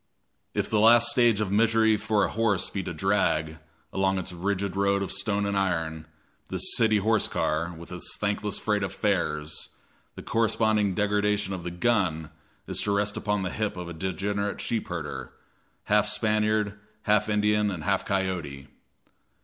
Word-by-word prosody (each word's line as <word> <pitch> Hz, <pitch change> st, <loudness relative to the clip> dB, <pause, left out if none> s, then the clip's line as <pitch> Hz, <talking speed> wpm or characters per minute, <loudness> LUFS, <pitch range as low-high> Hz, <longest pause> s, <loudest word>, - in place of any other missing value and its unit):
If -, -, 0 dB
the 110 Hz, -, +1 dB
last 115 Hz, +2 st, +6 dB
stage 120 Hz, -4 st, +3 dB
of 100 Hz, -3 st, -1 dB
misery 110 Hz, +1 st, +4 dB
for 105 Hz, -1 st, +1 dB
a -, -, +1 dB
horse 110 Hz, -5 st, +1 dB
be 100 Hz, -, -2 dB
to -, -, -5 dB
drag, 80 Hz, -3 st, 0 dB, 0.3 s
along 95 Hz, 0 st, +1 dB
its 95 Hz, 0 st, -4 dB
rigid 95 Hz, +2 st, -2 dB
road 100 Hz, 0 st, +2 dB
of 95 Hz, -, -4 dB
stone 105 Hz, -2 st, 0 dB
and 100 Hz, 0 st, -1 dB
iron, 80 Hz, -5 st, -1 dB, 0.4 s
the -, -, -3 dB
city 110 Hz, -2 st, +3 dB
horse 110 Hz, +2 st, +2 dB
car 85 Hz, +3 st, -1 dB
with 85 Hz, +2 st, -11 dB
its 90 Hz, -, -4 dB
thankless 105 Hz, 0 st, -1 dB
freight 105 Hz, -1 st, 0 dB
of 95 Hz, -, -2 dB
fares, 80 Hz, -7 st, -2 dB, 0.5 s
the -, -, -9 dB
corresponding 110 Hz, -3 st, +1 dB
degradation 105 Hz, -1 st, +1 dB
of 95 Hz, -, -5 dB
the 85 Hz, -, -4 dB
"gun" 90 Hz, -5 st, 0 dB, 0.3 s
is -, -, -2 dB
to 105 Hz, -, -1 dB
rest 100 Hz, 0 st, 0 dB
upon 105 Hz, -2 st, -1 dB
the 95 Hz, -, -3 dB
hip 105 Hz, -3 st, -2 dB
of 90 Hz, -1 st, -6 dB
a -, -, -6 dB
degenerate 100 Hz, +4 st, -2 dB
sheep 115 Hz, -2 st, -2 dB
herder, 85 Hz, -4 st, -5 dB, 0.5 s
half 105 Hz, 0 st, +3 dB
Spaniard, 105 Hz, -1 st, +1 dB, 0.2 s
half 105 Hz, 0 st, +2 dB
Indian 105 Hz, 0 st, +2 dB
and 90 Hz, -6 st, -5 dB
half 100 Hz, +2 st, +1 dB
coyote. 90 Hz, -9 st, -3 dB
100 Hz, 165 wpm, -26 LUFS, 90-105 Hz, 0.5 s, last